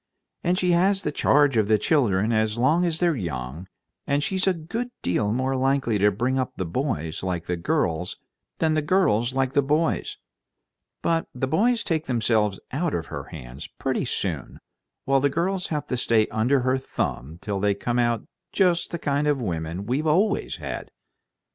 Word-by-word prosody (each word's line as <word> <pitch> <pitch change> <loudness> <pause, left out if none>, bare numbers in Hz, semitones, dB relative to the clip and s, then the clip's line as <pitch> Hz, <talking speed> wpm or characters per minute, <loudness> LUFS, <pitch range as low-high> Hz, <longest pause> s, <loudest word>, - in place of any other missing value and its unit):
"And 175 +1 +2
she 180 -1 +2
has 190 +3 +3
the 150 - -1
charge 145 -3 +3
of 110 -2 +3
the 110 0 +4
children 110 - +2
as 110 0 +1
long 150 +9 +3
as 165 -1 -1
they're 175 -3 +2
young, 75 - -5 0.4
and 140 +1 +1
she's 190 +2 0
a 190 - +4
good 220 +10 -4
deal 105 +4 +1
more 130 +3 0
likely 130 -4 +1
to 105 +1 +5
bring 125 +6 0
up 130 - -2
the 95 - -3
boys 85 - -2
like 90 -2 -3 0.2
girls 85 +1 0 0.4
than 160 -1 +2
the 155 - +2
girls 130 - +2
like 135 -1 +1
boys. 150 +4 +1 0.9
But 165 -1 +1
the 130 +1 -1
boys 230 - +2
take 160 -2 -1
themselves 110 -5 +1
out 165 +4 -1
of 85 - -2
her - - -5
hands 65 +5 -9
pretty - - -2
soon, - - -3 0.5
while 135 0 +3
the 140 +1 +2
girls 180 +5 -1
have 150 -2 -2
to 125 - -2
stay 115 -3 +3
under 125 +5 +2
her 130 +1 +1
thumb 75 - -4
till 100 +1 -3
they 100 0 +2
come 120 +4 -1
out 120 -1 +1 0.3
just 180 -3 +2
the 170 - -3
kind 145 -1 0
of 145 -2 +2
women 85 -3 -3
we've 135 +7 -1
always 195 +7 +2
had." - - -6
130 Hz, 180 wpm, -25 LUFS, 105-160 Hz, 0.9 s, to